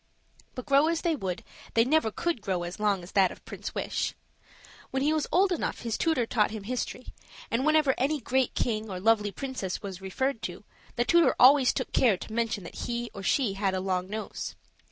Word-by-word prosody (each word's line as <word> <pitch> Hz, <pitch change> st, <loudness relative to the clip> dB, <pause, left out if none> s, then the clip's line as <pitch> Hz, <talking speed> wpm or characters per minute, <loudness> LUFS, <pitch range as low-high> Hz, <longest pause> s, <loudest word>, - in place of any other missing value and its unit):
But 255 Hz, -, -6 dB
grow 280 Hz, +1 st, +4 dB
as 330 Hz, 0 st, 0 dB
they 335 Hz, -3 st, +1 dB
would, 190 Hz, -9 st, -4 dB, 0.3 s
they 230 Hz, 0 st, +5 dB
never 300 Hz, -3 st, +3 dB
could 330 Hz, +3 st, -2 dB
grow 185 Hz, -3 st, -1 dB
as 175 Hz, +4 st, -6 dB
long 205 Hz, -3 st, +1 dB
as 175 Hz, -, -11 dB
that 190 Hz, -2 st, +4 dB
of -, -, -13 dB
Prince -, -, -7 dB
Wish. -, -, -2 dB, 0.7 s
When 265 Hz, 0 st, -1 dB
he 300 Hz, +2 st, +3 dB
was 310 Hz, -2 st, 0 dB
old 375 Hz, +2 st, +4 dB
enough 350 Hz, -, -2 dB
his 230 Hz, -2 st, -2 dB
tutor 320 Hz, -8 st, +1 dB
taught 220 Hz, -2 st, +2 dB
him 215 Hz, -2 st, -6 dB
history; 250 Hz, +2 st, -4 dB, 0.4 s
and 255 Hz, +6 st, +1 dB
whenever 310 Hz, -3 st, +4 dB
any 290 Hz, +4 st, +1 dB
great 260 Hz, -1 st, 0 dB
king 220 Hz, -2 st, -1 dB
or 185 Hz, -2 st, -4 dB
lovely 210 Hz, +1 st, +3 dB
princess 255 Hz, -8 st, -4 dB
was 190 Hz, -2 st, -6 dB
referred 230 Hz, +6 st, -2 dB
to, 175 Hz, +2 st, -6 dB, 0.3 s
the 240 Hz, +1 st, +1 dB
tutor 340 Hz, +2 st, +4 dB
always 265 Hz, 0 st, +7 dB
took -, -, -3 dB
care 225 Hz, -7 st, +4 dB
to 220 Hz, -, -9 dB
mention 230 Hz, -3 st, -1 dB
that 170 Hz, -, -7 dB
he 240 Hz, 0 st, -3 dB
or 200 Hz, -, -7 dB
she 220 Hz, +1 st, +1 dB
had 195 Hz, -1 st, 0 dB
a -, -, 0 dB
long 185 Hz, -1 st, -1 dB
nose. 215 Hz, +1 st, -5 dB
230 Hz, 210 wpm, -28 LUFS, 195-275 Hz, 0.7 s, always